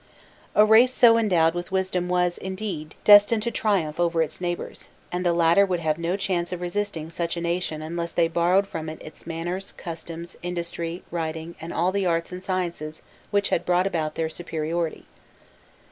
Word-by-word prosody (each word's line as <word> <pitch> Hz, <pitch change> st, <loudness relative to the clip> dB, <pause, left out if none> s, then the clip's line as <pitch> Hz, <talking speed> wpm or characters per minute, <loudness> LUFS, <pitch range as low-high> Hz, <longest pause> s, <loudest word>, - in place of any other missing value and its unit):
A 210 Hz, -, +7 dB
race 225 Hz, +4 st, +6 dB
so 240 Hz, -3 st, +6 dB
endowed 175 Hz, -8 st, +3 dB
with 175 Hz, +1 st, -5 dB
wisdom 185 Hz, -1 st, -1 dB
was, 180 Hz, -1 st, +1 dB
indeed, 190 Hz, -5 st, -5 dB
destined 210 Hz, +1 st, +7 dB
to 235 Hz, -, -1 dB
triumph 185 Hz, -9 st, 0 dB
over 170 Hz, -1 st, +2 dB
its 155 Hz, +3 st, -7 dB
neighbours, 175 Hz, -1 st, -4 dB, 0.2 s
and 180 Hz, +1 st, -2 dB
the 175 Hz, -, +3 dB
latter 170 Hz, +3 st, +5 dB
would 185 Hz, -3 st, 0 dB
have 155 Hz, 0 st, 0 dB
no 170 Hz, +3 st, -1 dB
chance 180 Hz, -3 st, -1 dB
of 180 Hz, -, -3 dB
resisting 175 Hz, -3 st, -3 dB
such 170 Hz, 0 st, -2 dB
a -, -, -2 dB
nation 170 Hz, -2 st, -2 dB
unless 170 Hz, +1 st, -4 dB
they 170 Hz, -1 st, +2 dB
borrowed 175 Hz, +4 st, +2 dB
from 160 Hz, -4 st, -5 dB
it 155 Hz, -, -8 dB
its 155 Hz, +1 st, -12 dB
manners, 175 Hz, +3 st, -4 dB
customs, 170 Hz, 0 st, -8 dB
industry, 170 Hz, -1 st, -4 dB
writing, 165 Hz, 0 st, -4 dB
and 165 Hz, +1 st, -6 dB
all 175 Hz, +3 st, +1 dB
the 195 Hz, -1 st, 0 dB
arts 170 Hz, +1 st, 0 dB
and 180 Hz, 0 st, -6 dB
sciences 175 Hz, -5 st, -3 dB, 0.3 s
which 200 Hz, -1 st, +1 dB
had 170 Hz, -, +1 dB
brought 180 Hz, +1 st, +2 dB
about 160 Hz, -5 st, -1 dB
their 160 Hz, -, 0 dB
superiority. 160 Hz, 0 st, -3 dB
175 Hz, 180 wpm, -25 LUFS, 165-185 Hz, 0.3 s, A